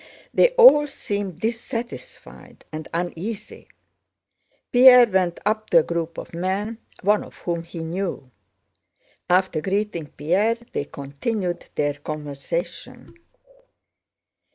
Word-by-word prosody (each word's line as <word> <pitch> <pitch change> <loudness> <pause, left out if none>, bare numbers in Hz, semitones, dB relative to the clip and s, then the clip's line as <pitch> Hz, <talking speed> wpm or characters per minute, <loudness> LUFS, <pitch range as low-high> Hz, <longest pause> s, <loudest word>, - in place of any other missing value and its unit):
They - - +5
all 380 -12 +8
seemed 200 - -4
dissatisfied 235 +1 -6
and 155 0 -6
uneasy. 180 +5 -5 1.0
Pierre 250 0 +9
went 185 -5 0
up 215 +1 0
to 170 - +5
a - - -6
group 170 0 -3
of - - -8
men, 195 +6 -2 0.2
one 210 +2 +3
of - - -14
whom 170 -1 -3
he 170 0 -8
knew. 170 -6 -4 1.0
After 180 -3 +2
greeting 195 -3 -2
Pierre 185 +11 +1 0.2
they 145 - -2
continued 175 +8 -4
their 145 -1 +1
conversation. 150 - -6
185 Hz, 105 wpm, -23 LUFS, 165-220 Hz, 1.0 s, Pierre